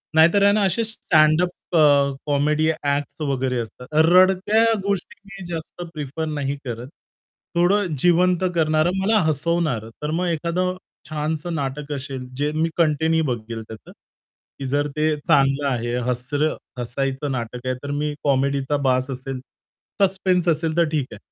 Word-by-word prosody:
नाहीतर 170 +6 +5
आहे 200 - +6
ना 210 -1 +2
अशे 195 +5 +1
स्टँडअप 165 -5 +3 0.3
अ, 140 -2 +5
कॉमेडी 150 +2 +1
एक्ट्स 145 0 -2
वगैरे 130 -3 -1
असतात. 120 +2 -7
रडक्या 185 +7 +5 0.2
गोष्टी 200 +1 -2
मी 195 -2 -10
जास्त 170 +1 -6
प्रिफर 150 +1 -4
नाही 145 -2 -2
करत. 120 +1 -5 0.7
थोडं 175 -1 +2
जिवंत 180 +2 +3
करणारं 155 +1 +2
मला 215 +3 +3
हसवणार, 155 -6 0
तर 150 +1 -2
मग 175 +2 0
एखादं 170 +3 -1 0.3
छानसं 155 +2 -3
नाटक 145 +1 -4
असेल, 135 -2 -6
जे 145 +1 0
मी 165 +1 +1
कंटिन्यू 160 0 +2
बघेल 115 -2 -4
त्याचं, 110 -1 -11 0.7
की 135 - -4
जर 145 +2 0
ते 155 0 +2
चांगलं 140 0 +2
आहे, 120 -2 -1
हसरं 145 +5 -1 0.2
हसायचं 135 +3 -2
नाटक 120 0 -5
आहे 130 - 0
तर 140 - -4
मी 150 +1 -1
कॉमेडीचा 140 0 +1
बास 130 +1 +1
असेल, 130 0 -5 0.6
सस्पेन्स 185 -2 +2
असेल 160 0 0
तर 170 - +5
ठीक 145 -4 -1
आहे. - - -9
150 Hz, 145 wpm, -22 LUFS, 135-170 Hz, 0.7 s, आहे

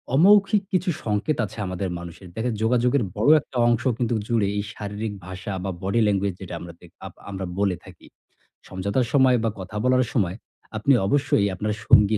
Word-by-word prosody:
অমৌখিক 200 +4 +5
কিছু 185 0 +1 0.2
সংকেত 105 +8 0
আছে 105 - -11
আমাদের 90 +1 -3
মানুষের। 90 +2 -10
দেখেন 115 +1 -1
যোগাযোগের 125 +2 +2
বড় 115 +8 +3
একটা 130 - -9
অংশ 120 -2 +2
কিন্তু 120 -1 0
জুড়ে 115 -4 +1
এই 100 - -1
শারীরিক 105 +1 -5
ভাষা 95 +2 -6
বা 95 - -2
body 100 +4 +1
language 100 -2 0
যেটা 90 -2 -7
আমরা 85 0 -9
দে - - -15 0.2
আপ - - -8 0.2
আমরা 95 -1 -4
বলে 100 -3 +2
থাকি। - - -15 0.6
সমঝোতার 100 +7 -1
সময় 130 -3 +5
বা 115 - +2
কথা 100 +3 -6
বলার 130 0 +3
সময়, 95 -7 +1 0.4
আপনি 135 +6 +3
অবশ্যই 135 -7 +2
আপনার 105 +3 -2
সঙ্গী 105 +1 +5
105 Hz, 175 wpm, -24 LUFS, 95-125 Hz, 0.6 s, অমৌখিক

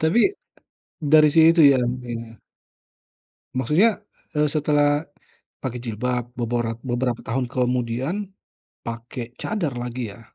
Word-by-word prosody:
tapi, 160 +9 +3 0.8
dari 155 0 +6
situ 165 +1 +6
ya, 130 - +2 0.3
Iya. 115 -1 -8 1.2
Maksudnya, 185 - +3 0.3
eee, 150 -1 +2
setelah 145 0 +2 0.6
pakai 125 -2 -4
jilbab 125 +2 -2 0.2
boborat 120 -1 -1
beberapa 120 -1 -1
tahun 125 +2 -1
kemudian 125 +4 -1 0.7
pakai 115 +1 -6
cadar 185 -10 -1
lagi 120 -3 -4
ya? 115 - -14
125 Hz, 105 wpm, -23 LUFS, 120-150 Hz, 1.2 s, dari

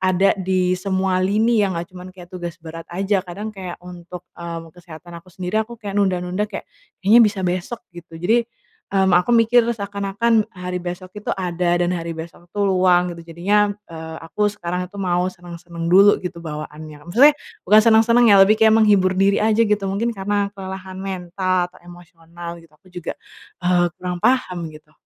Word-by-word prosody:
ada 185 +1 +3
di 185 -1 +1
semua 190 0 0
lini 215 +4 +2
yang 195 -4 0
nggak 170 +1 -6
cuman 180 0 -10
kayak 175 -1 -13
tugas 175 -2 -6
berat 165 0 -9
aja. 195 +2 0
Kadang 200 +4 -7
kayak 185 -3 -7
untuk, 180 0 -10 0.2
mmm, 165 -1 -7
kesehatan 170 0 -12
aku 185 - -22
sendiri, 185 +3 -2
aku 235 +2 -6
kayak 205 -2 -2
nunda-nunda 185 +1 -1
kayak, 205 - -7 0.4
"Kayaknya 220 +5 +7
bisa 210 -3 +3
besok," 180 +6 -3
gitu. 170 -1 -12
Jadi, 225 +8 +2 0.5
mmm, 190 -2 +3
aku 180 +6 +3
mikir 235 +1 +5
seakan-akan 205 +1 0
hari 180 -1 -5
besok 180 +1 -7
itu 210 - -4
ada 175 -2 0
dan 175 +1 +1
hari 165 0 -4
besok 170 +1 -10
itu 205 - -4
luang 180 -2 +3
gitu. 170 - -11
Jadinya, 205 +5 +2 0.2
eee, 160 -1 -8
aku 210 +5 0
sekarang 180 -2 -4
itu 205 - -13
mau 180 -1 +1
senang-senang 170 -1 -8
dulu 195 +4 +6
gitu 175 -2 -7
bawaannya. 155 -1 -8
Maksudnya 260 +12 +6 0.3
bukan 210 +3 +6
senang-senang 230 +2 +5
ya, 200 - +7
lebih 215 +3 +4
kayak 220 0 +5
menghibur 205 -4 +4
diri 195 +1 +3
aja 220 +1 +3
gitu, 210 -2 +1
mungkin 200 +5 -1
karena 200 0 -1
kelelahan 190 -1 -8
mental 185 -1 -2
atau 185 - -19
emosional 170 0 -11
gitu. 165 -1 -21
Aku 185 - -24
juga, 175 -2 -5 0.5
eee, 180 0 +3
kurang 180 -1 -4
paham 240 -5 +1 0.2
gitu. 155 0 -16
185 Hz, 175 wpm, -21 LUFS, 175-205 Hz, 0.5 s, Kayaknya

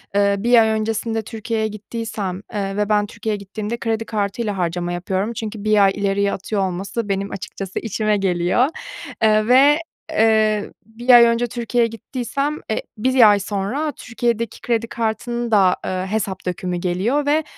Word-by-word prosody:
eee, 200 0 +3
1 235 +2 +5
ay 220 - +3
öncesinde 220 +1 -1
Türkiye'ye 220 0 -3
gittiysem, 215 -3 -5
eee, 195 -1 -2
ve 210 0 0
ben 210 -1 +3
Türkiye'ye 210 +1 -4
gittiğimde 210 +3 -5
kredi 225 -1 -2
kartıyla 210 0 -2
harcama 175 0 -1
yapıyorum 190 +5 -2
çünkü 215 -2 -6
1 215 -1 +4
ay 195 - +5
ileriye 200 0 0
atıyor 200 +2 -2
olması 195 +4 -3
benim 195 +1 -1
açıkçası 195 0 -5
işime 215 -1 0
geliyor. 185 +5 +2 0.6
Eee, 215 0 +4
ve, 275 +4 +6 0.3
eee, 220 -6 +2
1 230 +3 -10
ay 240 -1 +10
önce 235 +1 +2
Türkiye'ye 235 0 0
gittiysem, 270 +6 -3
e, 220 - 0 0.2
1 250 0 +5
ay 205 -1 +4
sonra 205 +10 -2
Türkiye'deki 235 -3 -3
kredi 230 -1 0
kartının 235 +1 -2
da, 190 -4 +5
eee, 185 0 -2
hesap 200 -3 -2
dökümü 180 -1 -2
geliyor 190 +12 0
ve, 300 +2 +2
215 Hz, 155 wpm, -20 LUFS, 200-230 Hz, 0.6 s, ay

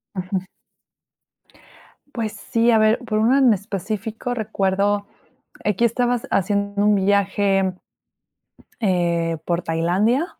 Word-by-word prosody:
Ujú. 185 0 -2 1.7
Pues, 220 -3 -3
sí. 230 +3 +1
A 225 - +5
ver, 215 +2 +3
por 215 -4 -2
una 245 +5 +4
en 250 -5 +5
específico 215 +4 -4
recuerdo, 205 -2 0 0.6
aquí 210 +3 +2
estabas 245 +1 0
haciendo 200 +1 0
un 210 0 +4
viaje, 195 -1 +1 1.1
eh, 170 -4 0
por 170 0 -1
Tailandia, 190 - +1
205 Hz, 105 wpm, -21 LUFS, 190-225 Hz, 1.7 s, A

